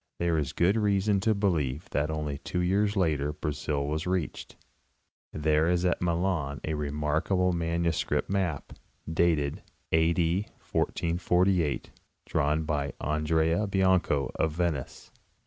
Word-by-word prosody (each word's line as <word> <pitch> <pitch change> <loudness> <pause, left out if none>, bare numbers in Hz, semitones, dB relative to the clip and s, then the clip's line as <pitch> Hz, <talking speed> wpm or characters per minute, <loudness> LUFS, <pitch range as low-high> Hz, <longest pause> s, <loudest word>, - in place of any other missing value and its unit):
There 85 -2 +1
is 70 -2 -2
good 90 +7 +2
reason 100 -1 +2
to 110 +2 +2
believe 80 -8 0
that 75 +1 0
only 75 -2 -3
two 90 +3 -3
years 100 +4 +1
later 75 -6 +1
Brazil 75 -2 -2
was 75 +3 -2
reached. 90 -3 -3 0.8
There 75 +1 +2
is 90 0 +1
at 90 - +1
Milan 85 -4 0
a 80 - -2
remarkable 75 +5 0
manu 85 0 0
script 80 - -1
map, 95 -7 -2 0.3
dated 80 -3 +1 0.3
A. 80 +1 +4
D. 85 +4 +1 0.2
1448, 90 -1 +1 0.3
drawn 75 +3 +1
by 75 -2 -2
Andrea 80 +5 +1
Bianco, 95 -8 +2
of 80 -1 0
Venice. 80 -6 -3
80 Hz, 130 wpm, -28 LUFS, 75-90 Hz, 0.8 s, A